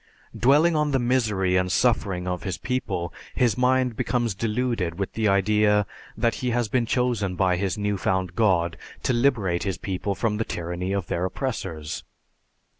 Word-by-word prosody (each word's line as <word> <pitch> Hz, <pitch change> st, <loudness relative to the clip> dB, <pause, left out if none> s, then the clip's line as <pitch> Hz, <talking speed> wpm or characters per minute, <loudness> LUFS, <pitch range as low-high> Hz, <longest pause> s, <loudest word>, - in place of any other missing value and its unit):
_ -, -, -11 dB
Dwelling 150 Hz, +7 st, +5 dB
on 150 Hz, -1 st, +2 dB
the 135 Hz, -, +2 dB
misery 110 Hz, -7 st, +1 dB
and 90 Hz, 0 st, 0 dB
suffering 95 Hz, -7 st, +1 dB
of 90 Hz, -1 st, -2 dB
his 95 Hz, -4 st, -3 dB
people, 90 Hz, -9 st, -3 dB, 0.2 s
his 120 Hz, -5 st, +2 dB
mind 125 Hz, -1 st, +2 dB
becomes 120 Hz, -1 st, 0 dB
deluded 110 Hz, -4 st, -1 dB
with 100 Hz, -1 st, -3 dB
the 110 Hz, -1 st, +1 dB
idea 105 Hz, +1 st, +3 dB, 0.3 s
that 115 Hz, -1 st, +2 dB
he 125 Hz, -, 0 dB
has 120 Hz, -1 st, +1 dB
been 120 Hz, +2 st, 0 dB
chosen 115 Hz, -8 st, 0 dB
by 90 Hz, 0 st, +2 dB
his 95 Hz, +1 st, -1 dB
new 105 Hz, -1 st, -1 dB
found 95 Hz, -2 st, 0 dB
God 90 Hz, -6 st, +2 dB, 0.3 s
to 130 Hz, -, +1 dB
liberate 115 Hz, -9 st, +2 dB
his 95 Hz, -3 st, -2 dB
people 95 Hz, +1 st, -3 dB
from 105 Hz, -1 st, 0 dB
the 115 Hz, -, 0 dB
tyranny 90 Hz, 0 st, -4 dB
of 100 Hz, -2 st, -1 dB
their 85 Hz, -, -2 dB
oppressors. 95 Hz, -, -4 dB
105 Hz, 175 wpm, -25 LUFS, 90-120 Hz, 0.3 s, Dwelling